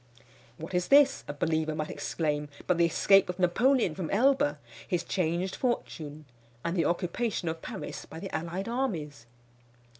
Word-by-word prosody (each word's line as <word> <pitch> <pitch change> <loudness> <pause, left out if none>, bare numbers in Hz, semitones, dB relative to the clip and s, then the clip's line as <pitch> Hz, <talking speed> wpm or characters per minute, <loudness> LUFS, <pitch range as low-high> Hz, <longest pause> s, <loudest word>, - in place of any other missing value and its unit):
"What 160 +4 -8
is 180 0 +1
this," 280 0 +5
a - - -4
believer 160 0 0
might 155 0 -3
exclaim, 150 -2 -2 0.2
"but 180 -2 +1
the 170 - +5
escape 195 +3 +4
of 180 - -3
Napoleon 195 - +3
from 175 -1 -4
Elba 230 - +3 0.3
his 175 -3 0
changed 180 +1 -1
fortune, 155 - -3 0.4
and 170 +2 -1
the 170 - +2
occupation 180 +3 -1
of 160 0 -3
Paris - - -6
by 160 - -9
the 195 +2 -5
allied 170 +5 -3
armies?" 160 - -3
175 Hz, 155 wpm, -29 LUFS, 160-195 Hz, 0.4 s, this